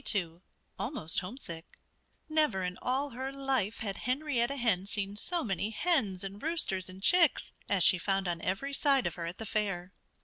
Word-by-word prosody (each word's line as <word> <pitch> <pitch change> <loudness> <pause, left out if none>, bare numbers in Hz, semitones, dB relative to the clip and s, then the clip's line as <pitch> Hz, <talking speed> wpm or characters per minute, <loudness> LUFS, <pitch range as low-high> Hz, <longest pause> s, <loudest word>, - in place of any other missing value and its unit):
XXII 175 -4 0 0.4
ALMOST 235 - -1
HOMESICK 180 -5 -7 0.5
Never 305 -11 +2
in 180 0 -2
all 270 +3 0
her 260 +3 -4
life 270 -6 -1
had 200 -3 -3
Henrietta 255 0 0
Hen 215 -8 +1
seen 205 -1 -3
so 340 +11 0
many 195 -1 -1
hens 220 - +1
and 195 +2 -7
roosters 200 - 0
and 190 +1 -9
chicks 345 - +5 0.2
as 195 -3 +3
she 185 - +6
found 195 +1 0
on 170 -1 -2
every 235 +12 -2
side 275 -2 +3
of - - -1
her, 170 -1 -5
at 170 - -6
the 225 - -5
fair. 195 -4 -2
210 Hz, 175 wpm, -31 LUFS, 185-270 Hz, 0.5 s, she